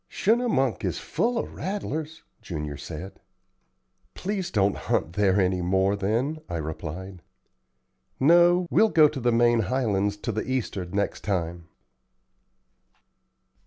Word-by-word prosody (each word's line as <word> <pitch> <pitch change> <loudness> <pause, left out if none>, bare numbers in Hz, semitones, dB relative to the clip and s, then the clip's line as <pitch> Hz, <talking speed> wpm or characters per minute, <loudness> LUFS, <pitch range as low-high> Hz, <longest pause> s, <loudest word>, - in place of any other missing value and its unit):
"Schunemunk 205 - +1
is - - -1
full 240 0 -1
of - - -3
rattlers," 160 -5 -4 0.2
Junior 75 -4 -5
said. 85 +7 -8 1.0
"Please 190 -2 -3
don't 100 -2 +2
hunt 80 - -1
there 100 0 +2
any 90 -1 +1
more 95 +3 +2
then," 115 +10 -1
I 85 - -2
replied. 85 +4 -6 1.0
"No, 175 +4 +5
we'll 220 - +5
go 155 -5 +6
into 150 -2 0
the 120 -1 +2
main 120 0 +4
Highlands 105 -3 0
to 115 - -1
the 110 0 -2
east'ard 105 -8 -3
next 100 0 -1
time." 85 -4 -2
105 Hz, 125 wpm, -26 LUFS, 95-155 Hz, 1.0 s, go